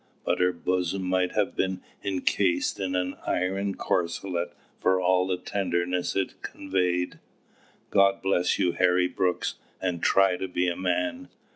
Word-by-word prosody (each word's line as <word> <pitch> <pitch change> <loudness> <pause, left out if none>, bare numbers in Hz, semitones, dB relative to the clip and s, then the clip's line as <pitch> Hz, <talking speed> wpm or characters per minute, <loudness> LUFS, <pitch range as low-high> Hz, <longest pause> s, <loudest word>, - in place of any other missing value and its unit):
But - - +1
her 90 0 +4
bosom 90 +2 -1
might 90 0 +1
have 105 -2 0
been 95 -1 0 0.2
encased 95 -1 +1
in 95 -1 -1
an 90 0 -1
iron 95 +2 0
corselet 85 0 -1 0.3
for 95 0 +3
all 90 0 +3
the 90 -1 0
tenderness 90 -1 -1
it 95 -1 -2
conveyed. 90 -2 -1 0.7
"God 100 0 +4
bless 90 -2 +2
you, 90 - +2
Harry 90 0 +3
Brooks, 90 -1 -1 0.2
and 90 -3 -2
try 95 -2 +4
to 95 - -3
be 90 0 0
a 85 - 0
man!" 90 +9 -1
90 Hz, 145 wpm, -27 LUFS, 90-95 Hz, 0.7 s, her